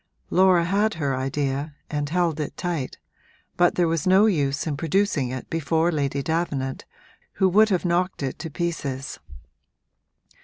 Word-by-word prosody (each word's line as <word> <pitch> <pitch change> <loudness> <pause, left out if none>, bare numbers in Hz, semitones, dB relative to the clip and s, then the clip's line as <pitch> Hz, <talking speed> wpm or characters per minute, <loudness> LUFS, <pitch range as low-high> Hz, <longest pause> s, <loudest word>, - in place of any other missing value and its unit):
Laura 185 -2 +5
had 205 +4 +1
her 140 -4 -1
idea 140 +2 -2
and 145 -1 -2
held 170 -2 0
it 150 - -4
tight, 170 -7 -3 0.6
but 175 0 +3
there 175 -1 +2
was 165 +1 -1
no 190 +3 +6
use 145 -8 +1
in 155 -3 -2
producing 160 -3 0
it 130 0 -6
before 165 +1 +1
Lady 140 -3 -1
Davenant, 145 -5 -2 0.5
who 190 - +2
would 215 +4 +5
have 185 -2 0
knocked 175 -2 0
it 135 - -3
to 165 - -5
pieces. 145 -5 -4
160 Hz, 150 wpm, -24 LUFS, 140-180 Hz, 0.6 s, no